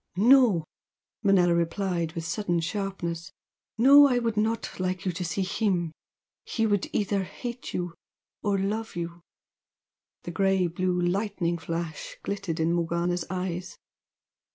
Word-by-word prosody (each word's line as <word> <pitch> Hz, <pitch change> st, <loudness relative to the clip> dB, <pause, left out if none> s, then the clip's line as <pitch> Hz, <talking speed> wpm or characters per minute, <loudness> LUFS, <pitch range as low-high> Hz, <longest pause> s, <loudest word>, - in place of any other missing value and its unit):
"No!" 225 Hz, -, +5 dB, 0.6 s
Manella 190 Hz, -4 st, +4 dB
replied 170 Hz, -1 st, -1 dB
with 165 Hz, -2 st, -4 dB
sudden 175 Hz, -1 st, 0 dB
sharpness 170 Hz, -2 st, -3 dB, 0.5 s
"No! 280 Hz, +5 st, +8 dB
I 250 Hz, -3 st, +2 dB
would 230 Hz, -2 st, 0 dB
not 220 Hz, 0 st, -1 dB
like 185 Hz, 0 st, -2 dB
you 185 Hz, -, +1 dB
to 180 Hz, +1 st, -4 dB
see 175 Hz, +3 st, -1 dB
him! 185 Hz, -4 st, 0 dB, 0.5 s
He 225 Hz, -, -1 dB
would 205 Hz, -3 st, +1 dB
either 200 Hz, -1 st, 0 dB
hate 240 Hz, +6 st, -6 dB
you 175 Hz, -1 st, -2 dB, 0.5 s
or 200 Hz, -1 st, +1 dB
love 210 Hz, +3 st, -2 dB
you!" 170 Hz, 0 st, -5 dB, 1.0 s
The 175 Hz, -, -5 dB
grey 195 Hz, 0 st, +2 dB
blue 180 Hz, +1 st, 0 dB
lightning 175 Hz, -1 st, 0 dB
flash 165 Hz, -1 st, -5 dB
glittered 195 Hz, -5 st, -3 dB
in 165 Hz, +1 st, +2 dB
Morgana's 170 Hz, 0 st, 0 dB
eyes. 180 Hz, 0 st, -4 dB
185 Hz, 130 wpm, -27 LUFS, 170-205 Hz, 1.0 s, No